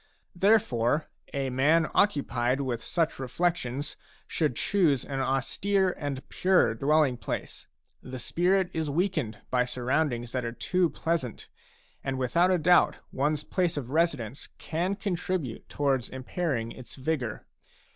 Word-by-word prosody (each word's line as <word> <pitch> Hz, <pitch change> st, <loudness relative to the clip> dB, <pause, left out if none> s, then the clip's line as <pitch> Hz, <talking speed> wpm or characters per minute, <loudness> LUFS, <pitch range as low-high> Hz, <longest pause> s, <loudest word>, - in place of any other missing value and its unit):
Therefore, 160 Hz, -, +2 dB, 0.2 s
a 135 Hz, -2 st, -2 dB
man 155 Hz, +5 st, +3 dB
occupied 130 Hz, -, +2 dB
with 125 Hz, -4 st, -2 dB
such 165 Hz, -4 st, 0 dB
reflections 140 Hz, -1 st, -1 dB, 0.3 s
should 150 Hz, -6 st, 0 dB
choose 160 Hz, -, +2 dB
an 135 Hz, -1 st, -3 dB
austere 185 Hz, +9 st, +1 dB
and 140 Hz, -3 st, -5 dB
pure 185 Hz, -10 st, +3 dB
dwelling 140 Hz, +1 st, +2 dB
place. 110 Hz, -, -5 dB, 0.3 s
The 130 Hz, 0 st, -7 dB
spirit 180 Hz, +8 st, +1 dB
is 160 Hz, -2 st, -1 dB
weakened 155 Hz, -, 0 dB
by 125 Hz, -1 st, +3 dB
surroundings 125 Hz, -1 st, -1 dB
that 130 Hz, -1 st, -2 dB
are 115 Hz, 0 st, -3 dB
too 180 Hz, +6 st, +1 dB
pleasant, 155 Hz, -4 st, -3 dB, 0.5 s
and 135 Hz, -1 st, -2 dB
without 170 Hz, +8 st, +2 dB
a 185 Hz, -, +4 dB
doubt 175 Hz, +2 st, +4 dB, 0.2 s
one's 150 Hz, +2 st, 0 dB
place 175 Hz, -3 st, 0 dB
of 130 Hz, -3 st, -4 dB
residence 145 Hz, -7 st, 0 dB
can 175 Hz, +5 st, -1 dB
contribute 180 Hz, -, -3 dB
towards 135 Hz, -4 st, 0 dB
impairing 130 Hz, -3 st, -2 dB
its 130 Hz, -, -10 dB
vigour. 130 Hz, -5 st, -2 dB
145 Hz, 130 wpm, -28 LUFS, 125-175 Hz, 0.5 s, a